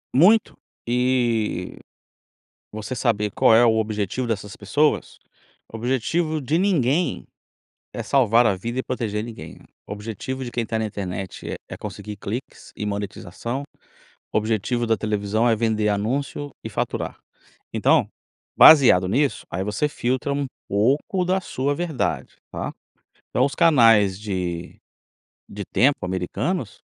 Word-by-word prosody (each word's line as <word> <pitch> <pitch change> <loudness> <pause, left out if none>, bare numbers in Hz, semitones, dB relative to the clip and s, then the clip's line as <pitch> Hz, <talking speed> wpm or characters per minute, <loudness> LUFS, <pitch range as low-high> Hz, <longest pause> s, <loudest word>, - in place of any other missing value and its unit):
Muito. 195 - +5 0.3
E 120 -6 0 0.9
você 110 +4 -5
saber 105 -3 0
qual 110 - +4
é 115 +2 +6
o 115 -1 +4
objetivo 110 +2 -2
dessas 105 -3 -4
pessoas, 145 +10 0 0.5
o - - -5
objetivo 140 +7 0
de 150 +4 0
ninguém 165 - +1 0.7
é - - -4
salvar 120 -3 +4
a 100 -4 +2
vida 120 +7 -3
e - - -5
proteger 110 -5 -3
ninguém. 115 0 -9 0.3
O - - -7
objetivo 115 +5 -5
de 120 - -6
quem 120 -1 -2
tá 110 +1 -2
na 110 - 0
internet 95 -2 -5
é - - -3 0.2
é - - -4
conseguir 105 -1 -7
cliques 115 +6 -7
e - - -4
monetização, 105 +4 -4 0.7
o - - +3
objetivo 115 +2 -1
da 110 0 +2
televisão 105 +2 0
é 115 - +4
vender 110 -1 +1
anúncio 135 +8 -2
e - - -5
faturar. - - -3 0.5
Então, - - +3 0.5
baseado 130 - +8
nisso, 140 +7 0
aí 95 - -2
você 105 +8 0
filtra 130 0 -1
um 140 0 -1 0.2
pouco 140 - +1
da 190 +1 +1
sua 140 -3 -1
verdade, 160 -4 -2
tá. - - -4 0.6
Então, 125 - +2
os 140 - -3
canais 115 - +5
de 90 -4 -4 0.7
de 100 0 -6
tempo 140 -5 +3
americanos 100 - -3
115 Hz, 140 wpm, -23 LUFS, 105-135 Hz, 0.9 s, baseado